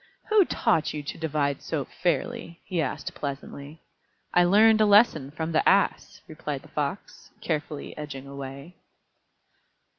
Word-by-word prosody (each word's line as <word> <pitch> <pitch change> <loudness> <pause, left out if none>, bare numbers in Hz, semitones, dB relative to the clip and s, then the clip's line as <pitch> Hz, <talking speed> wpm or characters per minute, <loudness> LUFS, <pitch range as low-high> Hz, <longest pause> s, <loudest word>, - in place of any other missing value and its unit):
"Who 425 -3 +5
taught 165 - +1
you 150 - -4
to 145 - -6
divide 145 -3 -1
so - - -3
fairly?" 170 0 -2
he 180 -4 -1
asked 135 - -4
pleasantly. 140 +2 -7 0.5
"I 175 - +5
learned 215 +4 +5
a 215 - +5
lesson 200 - +5
from 160 +2 -4
the 155 - +3
Ass," - - +1
replied - - -5
the - - -16
Fox, - - -4
carefully 150 -1 -4
edging 145 -3 -7
away. 140 +4 -9
155 Hz, 140 wpm, -26 LUFS, 140-180 Hz, 0.5 s, Who